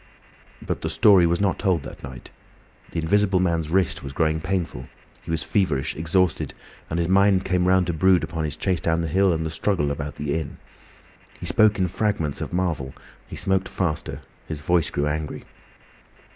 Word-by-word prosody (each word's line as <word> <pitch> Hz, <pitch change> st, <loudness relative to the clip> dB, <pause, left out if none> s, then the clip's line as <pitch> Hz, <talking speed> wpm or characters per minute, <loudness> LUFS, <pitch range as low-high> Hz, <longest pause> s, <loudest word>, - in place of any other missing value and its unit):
But -, -, -3 dB
the -, -, -2 dB
story 95 Hz, -5 st, +5 dB
was 85 Hz, +1 st, +1 dB
not 100 Hz, -2 st, +1 dB
told 90 Hz, -7 st, +1 dB
that -, -, -10 dB
night. 65 Hz, -2 st, -9 dB, 0.6 s
The -, -, -6 dB
Invisible 95 Hz, +2 st, +3 dB
Man's 85 Hz, -3 st, 0 dB
wrist 95 Hz, +2 st, +1 dB
was 70 Hz, 0 st, -7 dB
growing 80 Hz, 0 st, +1 dB
painful; 85 Hz, -9 st, -3 dB, 0.3 s
he -, -, -13 dB
was 80 Hz, -1 st, -1 dB
feverish, 80 Hz, -10 st, 0 dB
exhausted, 85 Hz, +2 st, 0 dB, 0.3 s
and 80 Hz, -, -2 dB
his 85 Hz, -1 st, 0 dB
mind 95 Hz, 0 st, +4 dB
came 90 Hz, -1 st, +1 dB
round 95 Hz, 0 st, +4 dB
to 85 Hz, -, -2 dB
brood 90 Hz, +1 st, +3 dB
upon 80 Hz, 0 st, -3 dB
his 75 Hz, 0 st, -3 dB
chase 90 Hz, +1 st, 0 dB
down 80 Hz, 0 st, 0 dB
the 85 Hz, -, -2 dB
hill 95 Hz, +4 st, +3 dB
and 80 Hz, -1 st, -1 dB
the 80 Hz, -, -3 dB
struggle 85 Hz, -3 st, 0 dB
about 70 Hz, 0 st, -5 dB
the 75 Hz, -1 st, -3 dB
inn. 80 Hz, -3 st, -4 dB, 0.8 s
He -, -, -6 dB
spoke 110 Hz, 0 st, +4 dB
in 95 Hz, -2 st, +1 dB
fragments 90 Hz, -6 st, -1 dB
of -, -, -4 dB
Marvel, 85 Hz, -7 st, -2 dB, 0.3 s
he -, -, -8 dB
smoked 95 Hz, -1 st, 0 dB
faster, 80 Hz, -4 st, -3 dB, 0.2 s
his 80 Hz, -2 st, -5 dB
voice 85 Hz, 0 st, +2 dB
grew 70 Hz, -, -1 dB
angry. 75 Hz, +1 st, -3 dB
85 Hz, 185 wpm, -24 LUFS, 80-95 Hz, 0.8 s, story